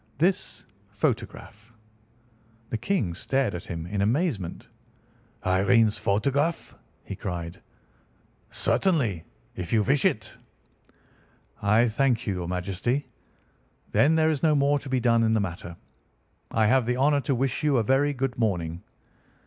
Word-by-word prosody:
"This 180 +4 0 0.2
photograph!" 110 +2 -3 1.0
The 115 - 0
King 110 - -1
stared 130 +5 0
at 90 - -6
him 85 -2 -5
in 100 +3 -2
amazement. 115 - -1 0.8
"Irene's 105 +4 +3
photograph!" 140 +11 0 0.3
he - - -7
cried. 85 -2 -6 0.9
"Certainly, 125 - 0 0.3
if 90 -2 -5
you 110 -2 +3
wish 135 +5 +2
it." - - 0 1.3
"I 110 +4 +4
thank 120 +1 +1
your 90 -4 -2
Majesty. 100 +10 -2 0.8
Then 155 +3 +4
there 160 0 +3
is 150 - -2
no 155 -2 +3
more 140 0 +3
to 135 - -9
be 130 -1 +1
done 115 -1 +3
in 110 0 +2
the - - +2
matter. 85 -3 -5 0.7
I 110 -1 +2
have 125 +2 +3
the 125 0 0
honour 140 +2 +3
to 140 -1 0
wish 130 +1 -1
you 145 -3 +3
a 115 - +2
very 135 +5 +2
good 135 -3 -3
morning." 90 -6 -1
115 Hz, 135 wpm, -26 LUFS, 100-140 Hz, 1.3 s, I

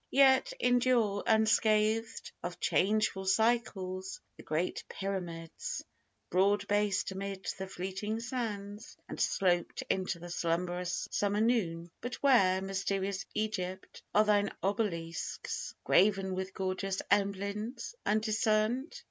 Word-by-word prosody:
Yet 275 - +5
endure 245 - +3
unscathed 220 0 +2
Of 175 0 -5
changeful 195 -1 +1
cycles 190 -4 0 0.2
the - - -12
great 160 +4 -2
Pyramids 175 -4 -4 0.5
Broad 200 +2 +3
based 205 -2 +1
amid 195 0 -5
the 190 - -4
fleeting 190 +4 -3
sands, 220 -4 -5
and - - -5
sloped 175 -2 +1
Into 185 -1 -1
the 175 +1 -9
slumberous 175 +1 -1
summer 205 0 +1
noon; 175 -8 +1
but 245 +1 -4
where, 190 -9 +4
Mysterious 195 0 -2
Egypt, 190 -4 -3
are 210 - +7
thine 205 -1 +3
obelisks 180 -5 -2
Graven 195 -1 +3
with 190 0 -4
gorgeous 190 0 -2
emblems 200 - -1
undiscerned? 220 +5 +1
200 Hz, 105 wpm, -32 LUFS, 185-215 Hz, 0.5 s, are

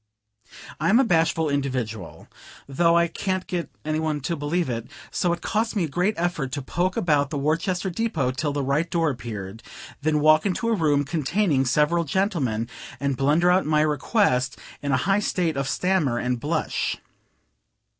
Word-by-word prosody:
I'm 195 - +4
a - - +5
bashful 165 -5 +2
individual, 125 - -3 0.4
though 170 +5 +3
I 170 0 +4
can't 185 +2 -2
get 175 -2 -3 0.2
any 155 0 0
one 155 -2 -1
to 170 +6 -2
believe 160 +4 -1
it; 115 -2 -4 0.2
so 175 - 0
it 170 0 -2
cost 225 +1 -1
me 195 - +1
a - - 0
great 180 +8 0
effort 165 -6 -1
to 145 - -2
poke 180 +7 -1
about 145 -4 +2
the 145 - -3
Worcester 170 +6 0
depot 170 - -1
till 145 +3 -2
the 140 -1 -2
right 145 +5 0
door 165 -3 +1
appeared, 110 -4 -7 0.4
then 155 0 +1
walk 155 +1 +5
into 205 +4 -1
a - - +3
room 150 -6 +2
containing 155 0 +1
several 150 +6 +2
gentlemen, 140 - -1 0.3
and 140 -1 0
blunder 150 +7 +3
out 185 -3 +2
my 155 -1 +3
request 145 - +1 0.2
in 140 - -2
a 135 - +3
high 195 +2 +3
state 175 -6 0
of 135 0 -2
stammer 170 -10 +1
and 125 0 -1
blush. 150 +6 -1
155 Hz, 175 wpm, -24 LUFS, 140-175 Hz, 0.4 s, a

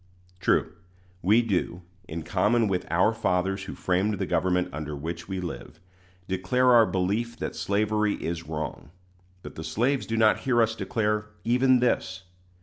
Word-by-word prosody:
True, 80 - +1 0.5
we 110 +6 +4
do, 90 -4 -2 0.2
in 80 +1 -5
common 105 +7 +2
with 95 -2 -2
"our 90 +6 +3
fathers 95 -2 -1
who - - -7
framed 95 +3 0
the - - -2
government 90 -1 +1
under 75 0 -5
which 85 +4 -6
we 95 -1 -3
live," 80 -3 -7 0.5
declare 95 +8 +2
our 115 -2 +6
belief 105 +6 -1
that - - -4
slavery 105 +1 0
is 85 -1 -5
wrong; 80 -2 -5 0.5
but - - -9
the 80 - -7
slaves 120 - 0
do 115 - -2
not 110 -1 +4
hear 125 -3 +1
us 115 -1 +3
declare 105 -2 -1 0.2
even 125 +1 +3
this. 95 -6 0
100 Hz, 155 wpm, -26 LUFS, 90-115 Hz, 0.5 s, our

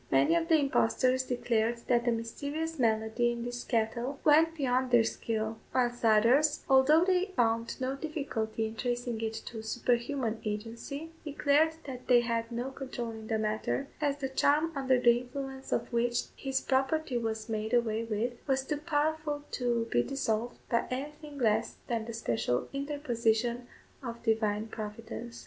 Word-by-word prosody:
Many 135 - +4
of 335 -1 +1
the 325 -2 +5
impostors 260 -2 +2
declared 235 -2 0
that 240 -1 +3
the 240 - +3
mysterious 285 +8 -3
malady 220 +1 +2
in 235 0 -5
his 245 0 -4
cattle 235 +3 -1
went 320 +2 +5
beyond 255 -2 +1
their 240 -2 +6
skill; 220 0 -2 0.2
whilst 245 -1 +1
others, 235 +7 +4
although 290 +5 +6
they 370 -1 +3
found 230 -1 +1
no 260 +1 -1
difficulty 275 -8 -3
in 220 0 -5
tracing 240 -1 -2
it 225 0 -2
to 225 -2 -6
superhuman 240 +1 -1
agency, 230 +9 -5
declared 300 +1 +2
that 255 -3 -8
they 245 -1 +6
had 230 0 -2
no 245 +3 -3
control 255 -3 -5
in 220 -1 -9
the 220 - 0
matter, 215 +6 -1
as 285 -1 +1
the 270 -2 -3
charm 295 +4 +2
under 260 -2 +2
the 240 -1 +5
influence 265 +1 -7
of - - -1
which 240 0 +1
his 270 -1 -1
property 265 0 +1
was 220 -1 -3
made 220 -1 -2
away 230 -2 +2
with, 230 +2 -1
was 265 -1 +1
too 295 - -1
powerful 300 -1 -1
to 240 -2 0
be 120 - +4
dissolved 235 - -2
by 235 - +1
anything 295 +3 -6
less 225 -3 +1
than 230 -2 -2
the 230 - -6
special 125 - -1
interposition 245 -4 0 0.3
of 235 -3 -7
Divine 220 -2 +1
Providence. 225 +2 -7
245 Hz, 160 wpm, -30 LUFS, 225-275 Hz, 0.3 s, their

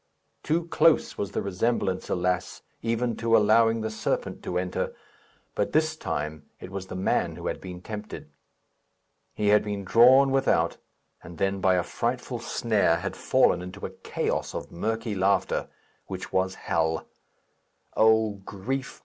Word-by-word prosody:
Too 165 +2 0
close 165 -1 +3
was 100 0 -4
the - - -1
resemblance, 95 -1 -1
alas! 90 0 -1 0.2
even 115 +1 0
to 115 0 +3
allowing 115 +1 +4
the 110 0 -3
serpent 110 - -2
to 90 - -3
enter; 90 0 -2 0.6
but 105 - -1
this 155 0 +2
time 75 - -4
it 90 - -9
was 95 -1 -5
the 90 - -7
man 95 - 0
who - - -9
had - - -3
been 90 -1 -8
tempted. 105 -1 -7 1.1
He 105 -1 +1
had 105 0 +5
been 105 -1 -4
drawn 130 +7 +6
without, 135 0 +2 0.4
and 80 0 -11
then, 95 0 0
by 95 -1 +4
a 90 - +1
frightful - - -3
snare, 105 -7 +1
had 85 - -4
fallen - - +3
into 90 +2 -7
a - - -5
chaos 95 - -3
of - - -6
murky 110 +4 -2
laughter, 95 0 +1 0.4
which - - -7
was 95 0 +1
hell. 80 0 -1 0.9
O 110 0 +4
grief! 125 +8 -4
105 Hz, 150 wpm, -26 LUFS, 95-115 Hz, 1.1 s, drawn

